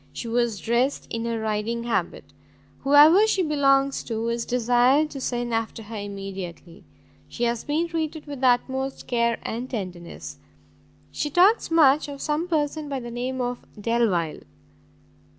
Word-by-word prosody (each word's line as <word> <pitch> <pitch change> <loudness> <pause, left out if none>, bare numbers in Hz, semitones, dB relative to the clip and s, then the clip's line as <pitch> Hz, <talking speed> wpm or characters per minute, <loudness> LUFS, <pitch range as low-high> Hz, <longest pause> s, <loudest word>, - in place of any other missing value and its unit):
She 235 - -6
was 235 -3 0
dressed 240 +4 0
in 230 0 -3
a 230 -1 -1
riding 220 +2 -2
habit. 235 - -2 0.6
Whoever 300 +9 +6
she 390 -4 +1
belongs 275 -3 +2
to 230 0 -2
is 235 0 -2
desired 250 +5 +3
to 275 - -7
send 240 -2 -2
after 225 0 -2
her 220 +2 -9
immediately. 195 -4 -7 0.5
She 240 - -4
has 235 -1 0
been 315 +4 0
treated 320 -2 -3
with 285 -3 -7
the 260 - +4
utmost 265 +2 0
care 235 -1 +1
and 245 +3 -4
tenderness. 180 -7 -7 0.7
She 295 - -2
talks 375 +9 +4
much 305 -3 +4
of 280 -1 -8
some 305 +4 -1
person 305 -2 -1
by 275 -2 -2
the 240 -1 -7
name 250 +2 -3
of 245 0 -2 0.2
Delvile. 205 -8 0
245 Hz, 150 wpm, -24 LUFS, 230-290 Hz, 0.7 s, Whoever